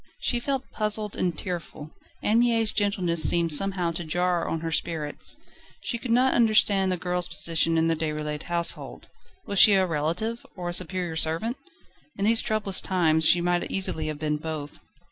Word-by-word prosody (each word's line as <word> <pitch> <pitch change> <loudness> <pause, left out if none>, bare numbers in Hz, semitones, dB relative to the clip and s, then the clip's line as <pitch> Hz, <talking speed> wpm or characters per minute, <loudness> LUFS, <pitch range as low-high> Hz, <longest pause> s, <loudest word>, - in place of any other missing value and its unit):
She 240 - -1
felt 270 +1 -2
puzzled 210 -1 -1
and 175 -3 -1
tearful. 165 -4 -6 0.3
Anne 220 +2 +3
Mie's 230 -2 +2
gentleness 185 -5 0
seemed 170 -1 +2
somehow 180 +1 +1
to 170 +1 -5
jar 175 +1 0
on 165 - -3
her 165 0 -3
spirits. 155 -2 -3 0.5
She 235 - -3
could 250 - -7
not 250 +3 +3
understand 210 -4 +3
the 180 - 0
girl's 180 0 +1
position 165 -1 +1
in 160 - +2
the 165 - +1
Déroulède 150 -1 -3
household. 170 0 -3 0.4
Was 200 -1 0
she 210 - +9
a 190 -1 +3
relative, 170 +9 -2
or 175 -2 -5
a - - -4
superior 180 -1 -2
servant? 165 +10 +1 0.6
In 200 - -1
these 225 +1 +4
troublous 215 -4 0
times 160 -4 +2
she 175 - +5
might 175 0 0
easily 160 -5 -1
have 155 -1 -4
been 150 0 -1
both. 150 -2 -6
175 Hz, 175 wpm, -25 LUFS, 160-205 Hz, 0.6 s, she